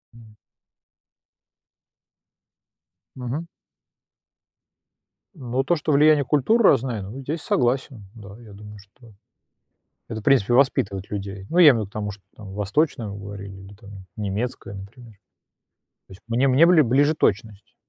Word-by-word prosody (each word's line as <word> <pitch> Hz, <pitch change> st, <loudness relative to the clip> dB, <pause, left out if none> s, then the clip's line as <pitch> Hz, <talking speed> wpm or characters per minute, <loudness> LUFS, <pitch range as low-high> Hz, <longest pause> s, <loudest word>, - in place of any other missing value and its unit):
М. 110 Hz, -2 st, -17 dB, 2.8 s
Мгм. 130 Hz, +6 st, -5 dB, 1.9 s
Ну, 130 Hz, -3 st, -3 dB
то, 175 Hz, +6 st, +1 dB
что 155 Hz, -1 st, -2 dB
влияние 150 Hz, 0 st, +4 dB
культур 150 Hz, -, +2 dB
разное, 125 Hz, -, +2 dB
ну, 105 Hz, +8 st, -8 dB
здесь 150 Hz, +4 st, -5 dB
согласен, 125 Hz, -6 st, -1 dB
да, 100 Hz, -3 st, -12 dB
я 110 Hz, -3 st, -14 dB
думаю, 105 Hz, +1 st, -12 dB
что 105 Hz, +3 st, -20 dB, 0.9 s
это, 110 Hz, -1 st, -6 dB
в -, -, -21 dB
принципе, 125 Hz, -4 st, +3 dB
воспитывать 100 Hz, -7 st, +1 dB
людей. 100 Hz, -1 st, -6 dB
Ну, 170 Hz, -, -2 dB
я 170 Hz, -4 st, +9 dB
имею -, -, 0 dB
в -, -, -1 dB
виду 100 Hz, -, -6 dB
к -, -, -28 dB
тому, 105 Hz, -1 st, -4 dB
что 100 Hz, 0 st, -14 dB
там 100 Hz, -3 st, -11 dB
восточную 105 Hz, +1 st, -1 dB
говорили 100 Hz, -1 st, -9 dB
или 95 Hz, +1 st, -13 dB
там 100 Hz, 0 st, -15 dB, 0.3 s
немецкое, 105 Hz, 0 st, -4 dB
например. 110 Hz, +4 st, -12 dB, 0.9 s
То -, -, -21 dB
есть. 95 Hz, -, -16 dB
Мне 120 Hz, +4 st, +1 dB
мне 135 Hz, +5 st, +5 dB
бли 170 Hz, -2 st, +5 dB
ближе 145 Hz, +4 st, +2 dB
точность, 105 Hz, -4 st, -2 dB
115 Hz, 140 wpm, -23 LUFS, 100-135 Hz, 2.8 s, я